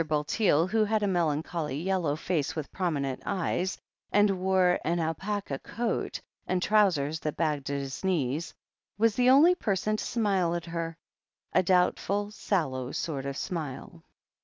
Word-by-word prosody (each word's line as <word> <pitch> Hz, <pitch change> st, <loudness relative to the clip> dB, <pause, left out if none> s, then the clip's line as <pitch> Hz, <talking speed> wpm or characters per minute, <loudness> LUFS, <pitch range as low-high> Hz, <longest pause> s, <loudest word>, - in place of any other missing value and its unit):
Bulteel, 155 Hz, +2 st, +2 dB
who 215 Hz, +4 st, +2 dB
had 215 Hz, 0 st, +1 dB
a -, -, +2 dB
melancholy 160 Hz, -4 st, -1 dB
yellow 175 Hz, -4 st, 0 dB
face 155 Hz, -2 st, -1 dB
with 155 Hz, -3 st, -5 dB
prominent 145 Hz, -8 st, -2 dB
eyes, 185 Hz, 0 st, -1 dB, 0.3 s
and 205 Hz, 0 st, +4 dB
wore 185 Hz, -1 st, +3 dB
an 170 Hz, +2 st, 0 dB
alpaca 165 Hz, -1 st, -2 dB
coat, 235 Hz, +1 st, -3 dB, 0.3 s
and 185 Hz, -, +1 dB
trousers 180 Hz, -7 st, +2 dB
that 150 Hz, -2 st, -4 dB
bagged 150 Hz, -4 st, -1 dB
at 140 Hz, -1 st, -2 dB
the 135 Hz, -1 st, -6 dB
knees, 155 Hz, -3 st, 0 dB, 0.5 s
was 225 Hz, +1 st, +3 dB
the 250 Hz, +3 st, +3 dB
only 295 Hz, +7 st, +7 dB
person 215 Hz, -, -1 dB
to -, -, -3 dB
smile 195 Hz, -7 st, +1 dB
at 170 Hz, -1 st, -4 dB
her 165 Hz, -1 st, -4 dB, 0.3 s
— -, -, -41 dB
b, -, -, +5 dB
doubtful, 190 Hz, +3 st, +1 dB
sallow 135 Hz, -12 st, -1 dB
sort 140 Hz, -4 st, -3 dB
of 140 Hz, 0 st, -4 dB
smile. 165 Hz, 0 st, -5 dB
175 Hz, 155 wpm, -28 LUFS, 150-200 Hz, 0.5 s, only